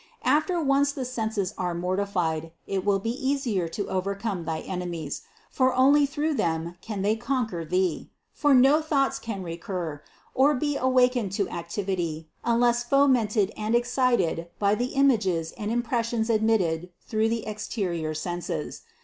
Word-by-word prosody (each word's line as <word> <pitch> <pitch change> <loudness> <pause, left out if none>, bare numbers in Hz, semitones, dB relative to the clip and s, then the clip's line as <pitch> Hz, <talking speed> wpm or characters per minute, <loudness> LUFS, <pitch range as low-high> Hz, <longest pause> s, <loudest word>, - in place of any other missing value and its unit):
After 340 +4 +2
once 280 -1 +3
the 270 -2 -4
senses 220 -5 -2
are 180 -2 -1
mortified, 180 -3 -1
it 195 -1 -2
will 200 0 +3
be 225 +4 -2
easy 255 - -1
to 200 +4 -4
overcome 195 0 -2
thy 160 -1 -2
enemies, 175 -5 -4 0.3
for 260 -1 +2
only 280 +3 +5
through 295 +3 -1
them 165 - -1
can 210 -3 -4
they 210 +2 +2
conquer 230 -7 -2
thee; 180 +1 -1 0.2
for 290 -2 +3
no 270 +5 +6
thoughts 285 -3 +1
can 205 -4 -5
recur, 170 -3 -5 0.3
or 285 +3 +4
be 290 +2 -1
awakened 250 -6 +2
to 200 0 +1
activ 170 +4 -5
ity, 165 -4 -2 0.2
unless 240 0 +2
fomented 240 -6 +3
and 215 +2 0
excited 240 -9 +1
by 200 0 +2
the 245 +5 -2
images 195 -12 +2
and 210 - -5
im 240 +1 0
pressions 230 -1 0
admitted 185 -6 +1 0.2
through 220 0 +1
the 230 -1 -2
exterior 185 -7 -3
senses. 175 +2 -4
215 Hz, 150 wpm, -26 LUFS, 180-255 Hz, 0.3 s, no